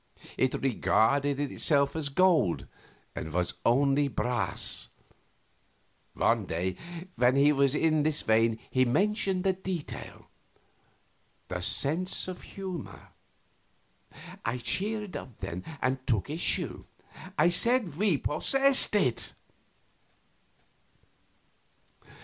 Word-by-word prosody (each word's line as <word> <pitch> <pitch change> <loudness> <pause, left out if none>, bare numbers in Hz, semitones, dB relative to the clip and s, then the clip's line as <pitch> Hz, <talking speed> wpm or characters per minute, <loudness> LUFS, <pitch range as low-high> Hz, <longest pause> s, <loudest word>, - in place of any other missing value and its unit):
It 130 - +1
regarded 135 +2 +2
itself 140 0 +1
as 155 -3 -2
gold, 155 - +2 0.5
and 80 - -5
was 90 +2 0
only 140 +3 +3
brass. 125 -2 -2 1.3
One - - +1
day 90 +3 -2 0.4
when 125 +1 +4
he 140 +2 +5
was 140 -1 +2
in 155 0 +2
this 150 0 0
vein 110 0 +3
he 130 - +3
mentioned 195 - 0
a 190 - +3
detail 185 -4 -6 1.2
the 90 - -3
sense 165 - 0
of 185 -1 -7
humor. 185 -5 -8 1.3
I 125 - -1
cheered 205 - -1
up 125 - -8
then, 90 -2 -6 0.2
and 130 +1 +1
took 110 +3 0
issue. 160 +3 0 0.5
I 175 - +5
said 210 - +1
we 190 -3 +2
possessed 270 - +3
it. 130 - 0
145 Hz, 100 wpm, -29 LUFS, 125-185 Hz, 1.3 s, he